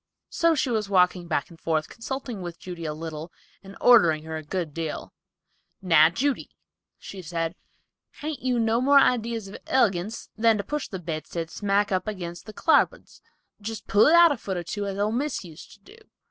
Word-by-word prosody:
So 335 -1 +3
she 260 -3 0
was 215 -3 -1
walking 180 -2 +3
back 155 0 -2
and 165 - -15
forth, 155 -2 -1
consulting 245 -3 -6
with 175 -1 -6
Judy 175 -2 -8
a 155 - -2
little 160 +1 -7 0.3
and 195 0 -12
ordering 170 -11 +5
her 160 0 -6
a 160 - -4
good 160 0 -4
deal. 165 -1 -5 0.7
"Now, 165 -4 +5
Judy," 260 +10 -1 0.5
said 165 -3 -4 0.6
she, - - -23
"hain't 310 -2 -4
you 250 -1 0
no 225 +1 +2
more 280 +2 +5
idees 235 -5 +2
of 195 - -9
ilegance 210 -4 0
than 225 0 +3
to 200 - -3
push 295 +7 -3
the 190 - -6
bedstead 165 -1 -5
smack 205 0 0
up 185 0 0
agin 180 -5 -4
the 215 - -8
clarbuds; 290 +8 +1 0.4
just 220 +1 -6
pull 205 +2 +5
it 320 - +6
out 340 -1 +8
a 285 - -1
foot 190 -4 -4
or 175 - -3
two, 200 +4 -4
as 195 0 -4
old 210 +2 0
Miss 275 +1 -2
use 165 -1 -12
to - - -17
do." 310 - -17
195 Hz, 195 wpm, -25 LUFS, 170-230 Hz, 0.7 s, out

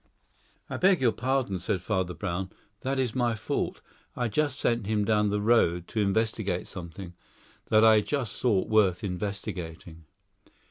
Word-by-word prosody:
"I - - -4
beg 190 -1 +4
your 125 -3 +3
pardon," 125 -6 -1
said 95 +2 -1
Father 95 -2 -2
Brown; 95 -1 -3 0.3
"that 135 +3 -2
is 125 -4 0
my 120 -3 +1
fault. 105 - -3 0.3
I 120 -2 -1
just 145 +2 0
sent 115 -4 0
him 105 -1 +1
down 105 -1 +2
the 105 +1 0
road 105 -6 +2
to 110 - -1
investigate 100 -2 0
something 90 0 -8 0.5
that 110 +1 +5
I 110 -1 +7
just 130 0 -2
thought 110 -7 +2
worth 105 -2 +3
investigating." 90 -4 -5
105 Hz, 150 wpm, -28 LUFS, 95-120 Hz, 0.5 s, I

